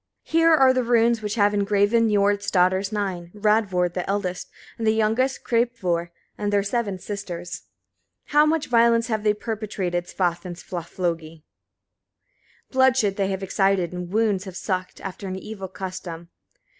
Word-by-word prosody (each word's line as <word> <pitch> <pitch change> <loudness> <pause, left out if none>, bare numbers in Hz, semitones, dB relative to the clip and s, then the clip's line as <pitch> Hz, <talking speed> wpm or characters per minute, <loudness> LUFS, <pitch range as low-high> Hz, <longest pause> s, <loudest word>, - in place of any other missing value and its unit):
79. 330 +1 +2
Here 330 -1 +6
are 260 -3 +4
runes 235 -1 +3
which 210 0 -3
have 205 -2 +3
engraven 205 +3 +2
Niord's 205 0 +2
daughters 185 +2 +2
nine, 190 -5 -3
Radvor 205 -4 +2
the 180 0 -4
eldest, 195 -2 -2 0.3
and 225 - -1
the 220 - +4
youngest 225 +5 +1
Kreppvor, 230 -8 0 0.3
and 205 -1 -1
their 200 -1 +2
seven 205 -2 -1
sisters. 175 -3 -6 0.6
80. - - -18
How 300 +1 +6
much 315 -1 +1
violence 230 0 +3
have 215 -2 -1
they 210 -1 +3
perpetrated 200 -6 -3
Svaf 175 -2 -1
and 180 -2 -6
Svaflogi! 165 -3 -4 1.3
bloodshed 260 -6 +3
they 195 -1 0
have 195 0 -3
excited, 195 -2 +1
and 180 0 -6
wounds 210 -3 +1
have 190 -1 -7
sucked, 185 -2 -3
after 195 +1 -6
an 185 - -4
evil 195 0 -7
custom. 180 -3 -7
200 Hz, 155 wpm, -24 LUFS, 185-225 Hz, 1.3 s, Here